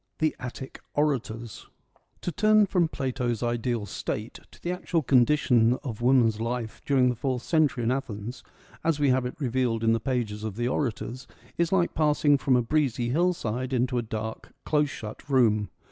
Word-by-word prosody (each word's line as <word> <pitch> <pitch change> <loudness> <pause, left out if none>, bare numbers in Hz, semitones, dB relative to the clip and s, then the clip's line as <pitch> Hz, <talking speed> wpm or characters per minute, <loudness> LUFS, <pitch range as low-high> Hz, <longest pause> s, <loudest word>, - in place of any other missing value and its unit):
XII. - - -50
— - - -51
The - - -15
Attic 125 +1 -7 0.2
Orators 120 -6 -2 0.5
To 175 - -2
turn 215 +2 +4
from 180 -3 +2
Plato's 125 -5 -2
ideal 120 -2 -1
State 105 +3 -5
to - - -18
the 175 - -3
actual 175 -2 -1
condition 125 -3 +4
of 120 -5 -5
woman's 120 -4 +4
life 115 -1 -3
during 130 -3 +4
the 125 - -1
fourth 125 0 -2
century 155 -6 +2
in 115 - +1
Athens, 120 -3 -4 0.4
as 160 -3 +1
we 145 -2 +3
have 130 -1 +2
it 125 - -7
revealed 125 -4 0
in 115 0 +4
the 115 - +1
pages 115 -4 -2
of 110 -3 -4
the 120 +2 -1
orators, 125 -1 -3 0.3
is 170 -1 0
like 180 -3 +2
passing 150 -2 +3
from 130 -1 +2
a 125 - +3
breezy 125 -3 0
hillsid 130 -6 0
into 125 0 +1
a - - 0
dark, 110 -1 -6
close 150 -1 +2
shut 110 +3 -8
room. 110 -7 +3
125 Hz, 180 wpm, -27 LUFS, 115-145 Hz, 0.5 s, turn